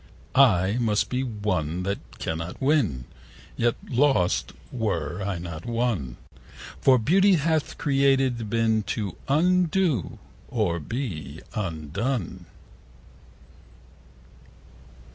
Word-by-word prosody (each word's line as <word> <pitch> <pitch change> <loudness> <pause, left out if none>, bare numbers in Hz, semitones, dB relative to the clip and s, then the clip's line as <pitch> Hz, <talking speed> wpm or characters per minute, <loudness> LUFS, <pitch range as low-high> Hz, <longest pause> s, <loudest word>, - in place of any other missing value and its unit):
I 105 -6 +4
must 110 -3 +1
be 130 +1 -1
won, 95 - -2
that 100 +2 -5
cannot 80 +2 -4
win, 130 - +1 0.5
Yet 120 0 +1
lost 125 -8 +2 0.2
were 95 - -2
I 95 -2 -2
not 85 -2 -7
won; 115 - -1
70 - - -24 0.4
For 130 -1 +6
beauty 190 - +4
hath 160 -1 0
created 135 -5 +2
been 110 0 +2
T' 105 -1 -3 0.2
undo, 175 - +2 0.3
or 85 -1 0
be 100 - -5
undone. 95 - -3
115 Hz, 95 wpm, -25 LUFS, 90-135 Hz, 0.5 s, For